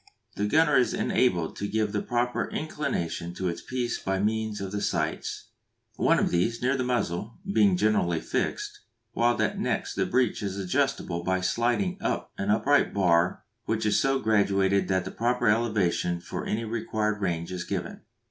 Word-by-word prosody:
The 105 - 0
gunner 150 +3 +4
is 125 - +2
enabled 90 -10 +1
to 100 - -2
give 110 0 0
the 105 - -1
proper 120 0 -1
inclination 85 - -3
to 95 - -4
his 85 -1 -2
piece 125 -2 -2
by 95 0 -1
means 110 +1 -1
of 95 -1 -5
the 100 0 -3
sights; - - -2 0.4
one - - +3
of - - +1
these, 115 +7 +1
near 130 +2 +1
the 130 - -1
muzzle, 115 -4 -2 0.2
being 100 -4 +4
generally 90 -5 +2
fixed, - - -3 0.3
while 120 +1 +2
that - - 0
next - - -1
the - - 0
breech 125 -2 +1
is 100 -1 -3
adjustable 100 -3 -1
by 95 +1 +1
sliding 120 - 0
up - - -2
an 100 - -1
upright 135 +6 +3
bar 90 -3 +2 0.2
which - - -1
is 105 - +3
so 135 0 +2
graduated 100 -4 +2
that 95 -1 0
the - - -5
proper 120 +2 0
elevation 105 -6 +1
for - - -6
any 115 +2 -1
required 110 -1 -2
range 85 -2 -2
is 90 -1 -3
given. - - -4
105 Hz, 175 wpm, -27 LUFS, 95-120 Hz, 0.4 s, gunner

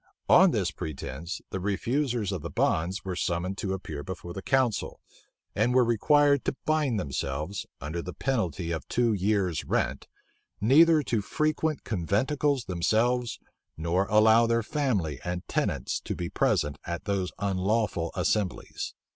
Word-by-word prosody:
On - - +8
this - - 0
pretence, 75 +3 -6
the 95 - -2
refusers 115 +3 -1
of 95 -5 -3
the - - -5
bonds 90 +4 0
were 95 -1 -3
summoned 90 +2 -2
to 95 -2 -2
appear 80 -6 -5
before 85 +1 -7
the 95 - -6
council, 130 -2 0 0.6
and 120 +4 +2
were 125 -1 +5
required 140 +5 +3
to - - 0
bind 150 -8 +1
themselves, 75 +4 -3
under 80 +4 -4
the 90 - -6
penalty 90 - -2
of 80 - -4
two 120 -2 +2
years' 100 -4 0
rent, 65 +2 -1 0.5
neither 150 +8 +6
to 115 -4 0
frequent 155 +5 -1
conventicles 130 - 0
themselves, 115 +7 +1 0.4
nor 85 +4 0
allow 110 +2 +5
their 115 0 +1
family 105 - -1
and 90 0 -4
tenants - - -1
to - - -5
be 85 -1 -4
present 75 -1 +1
at 85 0 -5
those 100 -3 -1
unlawful 100 -3 0
assemblies. 105 -5 -2
100 Hz, 145 wpm, -28 LUFS, 85-120 Hz, 0.6 s, On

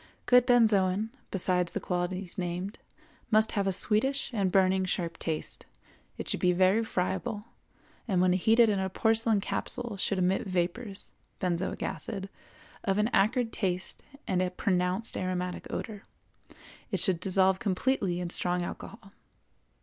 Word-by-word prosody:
Good 250 0 +5
benzoin, 215 -3 +3 0.2
besides 180 -2 0
the - - -1
qualities 180 0 -3
named, 180 +2 -4 0.5
must 215 0 +4
have 200 -1 -1
a - - +2
sweetish 230 +10 +3
and 195 -4 0
burning 190 0 +3
sharp 170 -2 -3
taste, 160 -2 -4 0.5
it - - -6
should - - -1
be 180 0 +3
very 190 +5 +3
friable, 210 +2 -2 0.6
and 190 -5 +1
when 180 0 +4
heated 225 +5 +4
in 205 -2 +1
a 190 0 -1
porcelain 225 +1 +2
capsule 235 +1 -3
should 195 0 -1
emit 185 +2 +1
vapors 185 +3 -2 0.3
(benzoic 180 -1 -2
acid) 195 -3 -4 0.5
of 195 -2 0
an 210 +2 +2
acrid 225 +4 +2
taste 185 -3 -2 0.3
and 185 -1 +1
a 185 - 0
pronounced 185 +3 -1
aromatic 180 -1 -3
odor; 215 -1 -5 0.9
it - - -1
should 185 -5 +3
dissolve 190 0 +2
completely 195 -2 0
in 175 -1 -3
strong 180 0 +2
alcohol. 200 +3 -8
190 Hz, 140 wpm, -29 LUFS, 180-215 Hz, 0.9 s, Good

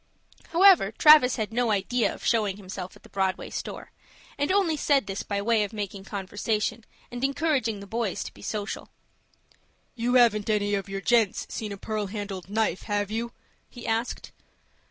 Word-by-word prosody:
However, 345 - +6
Travis 280 0 +7
had 220 -1 -3
no 240 0 +1
idea 215 +4 +1
of - - -9
showing 210 -4 +1
himself 185 -2 -7
at - - -19
the - - -16
Broadway 190 -1 -1
store, - - -6 0.4
and 290 +4 0
only 375 -5 +2
said 285 -2 +2
this 195 0 -4
by 200 -1 -3
way 225 -1 +3
of 205 - -5
making 200 -2 -5
conversation, 210 +3 -2 0.3
and 245 +1 -6
encouraging 275 -7 0
the - - -8
boys 225 -2 -2
to - - -9
be - - -16
social. 210 -1 -4 1.0
"You 245 +1 0
haven't 225 -4 +4
any 205 -1 +1
of 200 0 -2
you 195 0 -4
gents 225 -3 +2
seen 215 -2 -4
a 200 - -6
pearl 215 0 -3
handled 195 -2 -6
knife, 220 -2 0
have 205 0 -1
you?" 230 +2 -2 0.4
he 240 - -11
asked. 225 +2 -2
215 Hz, 175 wpm, -26 LUFS, 200-240 Hz, 1.0 s, Travis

